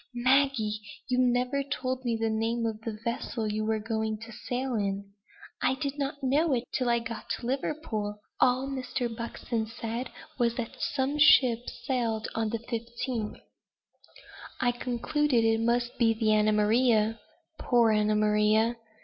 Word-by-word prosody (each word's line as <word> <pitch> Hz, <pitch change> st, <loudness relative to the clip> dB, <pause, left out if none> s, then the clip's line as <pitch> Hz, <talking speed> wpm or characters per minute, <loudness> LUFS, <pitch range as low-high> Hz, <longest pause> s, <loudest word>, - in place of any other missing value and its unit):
Maggie! 250 Hz, -4 st, +2 dB, 0.3 s
you 250 Hz, 0 st, +2 dB
never 250 Hz, +2 st, +2 dB
told 260 Hz, -1 st, -3 dB
me 235 Hz, -2 st, 0 dB
the 225 Hz, 0 st, 0 dB
name 225 Hz, +1 st, 0 dB
of 220 Hz, -1 st, -3 dB
the 220 Hz, -1 st, -5 dB
vessel 235 Hz, -1 st, -2 dB
you 215 Hz, +1 st, -1 dB
were 220 Hz, 0 st, +1 dB
going 220 Hz, 0 st, -2 dB
to 230 Hz, +1 st, -9 dB
sail 250 Hz, +3 st, -3 dB
in!" 200 Hz, -2 st, -2 dB, 0.5 s
"I 260 Hz, -, +2 dB
did 280 Hz, +2 st, -4 dB
not 280 Hz, 0 st, -3 dB
know 285 Hz, +4 st, +2 dB
it 240 Hz, -, -1 dB
till 255 Hz, -2 st, +1 dB
I 235 Hz, -, +4 dB
got 230 Hz, -1 st, -6 dB
to -, -, -3 dB
Liverpool. 245 Hz, -6 st, -2 dB, 0.2 s
All 255 Hz, +1 st, +3 dB
Mr. 255 Hz, -3 st, -3 dB
Buxton 230 Hz, -1 st, -3 dB
said 230 Hz, +2 st, -4 dB, 0.3 s
was, 235 Hz, -1 st, +2 dB
that 235 Hz, -2 st, -5 dB
some 280 Hz, +2 st, -1 dB
ship 245 Hz, -5 st, +6 dB
sailed 240 Hz, -3 st, -2 dB
on 225 Hz, -1 st, 0 dB
the 230 Hz, -, -1 dB
15th." 235 Hz, 0 st, -4 dB, 1.2 s
"I 245 Hz, -1 st, +3 dB
concluded 245 Hz, +1 st, 0 dB
it 225 Hz, 0 st, +3 dB
must 240 Hz, +1 st, +1 dB
be 225 Hz, -2 st, +4 dB
the 220 Hz, -1 st, +1 dB
Anna 215 Hz, 0 st, +4 dB
Maria, 220 Hz, +1 st, +3 dB, 0.4 s
(poor 235 Hz, -3 st, +3 dB
Anna 215 Hz, 0 st, +2 dB
Maria!) 215 Hz, +2 st, +3 dB
235 Hz, 155 wpm, -28 LUFS, 220-255 Hz, 1.2 s, ship